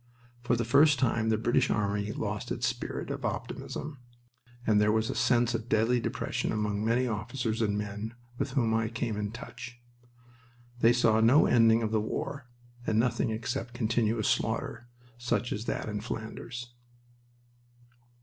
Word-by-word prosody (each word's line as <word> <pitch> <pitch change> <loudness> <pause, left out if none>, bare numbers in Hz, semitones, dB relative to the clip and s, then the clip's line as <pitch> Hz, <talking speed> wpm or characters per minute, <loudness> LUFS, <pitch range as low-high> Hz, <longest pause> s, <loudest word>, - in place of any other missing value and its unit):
For 120 0 +1
the 115 -1 -1
first 140 +4 +5
time 115 -4 +1
the 110 - +3
British 115 +2 +2
army 100 0 0
lost - - -4
its - - -1
spirit - - -3
of - - -5
optimism, 145 -2 -4 0.7
and 105 -1 +4
there 105 0 +4
was 110 +1 +1
a - - -5
sense 120 0 +3
of 115 0 -3
deadly 115 +3 +3
depression 115 - -2
among 105 -1 -1
many 115 +3 +2
officers 115 0 -2
and 105 -2 +1
men 105 +2 -4 0.2
with 130 - -2
whom 120 -5 +2
I 115 0 +1
came 115 -1 -3
in 105 0 -2
touch. 120 +1 -9 1.0
They 115 - +6
saw 115 -2 +3
no 120 +7 +6
ending 115 -1 +5
of 110 - -1
the 110 -1 +2
war, 135 +4 -4 0.4
and 110 - +2
nothing 120 0 +2
except 120 +1 -3
continuous 115 -2 +1
slaughter, 120 - -1 0.3
such 120 0 -1
as 105 +2 -4
that - - -2
in 105 -1 -3
Flanders. 120 +2 -6
115 Hz, 160 wpm, -29 LUFS, 110-120 Hz, 1.0 s, They